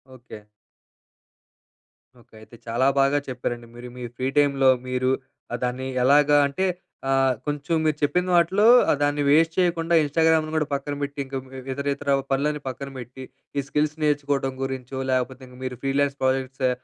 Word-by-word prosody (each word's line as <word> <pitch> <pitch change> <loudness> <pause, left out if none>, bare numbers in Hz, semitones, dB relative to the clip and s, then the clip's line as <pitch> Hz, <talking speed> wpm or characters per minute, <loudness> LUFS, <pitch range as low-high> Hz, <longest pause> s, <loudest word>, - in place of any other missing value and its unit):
Okay. 115 -4 -12 1.8
Okay. - - -28
అయితే 115 - -15
చాలా 120 +3 +1
బాగా 140 +1 +3
చెప్పారండి, 120 -2 -4
మీరు 120 +1 -9
మీ 125 - -7
ఫ్రీ 130 - -1
టైమ్‌లో 140 -2 +4 0.2
మీరు 130 0 0 0.4
ఆహ్, 120 - -2
దాన్ని 125 +1 -2 0.2
ఎలాగా 145 +2 +5
అంటే, 140 +7 -2 0.4
ఆహ్, 135 -1 +3
కొంచెం 150 +3 -1
మీరు 155 -1 +1
చెప్పిన 180 +5 +1
వాటిలో 190 +5 +3 0.3
ఆహ్, - - +1
దాన్ని 145 0 +1
వేస్ట్ 160 +2 +4
చేయకుండా, 170 -1 +1
ఇన్‌స్టాగ్రామును 160 +1 +2
గూడా 150 -2 +1
పక్కన 145 +1 -4
బెట్టింక 140 -1 -5
హ్మ్, 130 - -14
వే 130 - -7 0.2
ఇతరితరా 140 0 -1 0.2
పనులన్నీ 150 +2 0
పక్కన 135 +2 -7
బెట్టి, 125 +2 -9 0.3
ఈ - - +2
స్కిల్స్ 150 +2 0
నేర్చుకోటం 145 -2 0
గురించో, 130 0 -5
లేకపోతింక 130 0 -3
మీరు 125 -2 -4
ఫ్రీలాన్స్ 140 +1 +1
ప్రాజెక్ట్సా 130 0 0
140 Hz, 150 wpm, -24 LUFS, 130-150 Hz, 1.8 s, ఎలాగా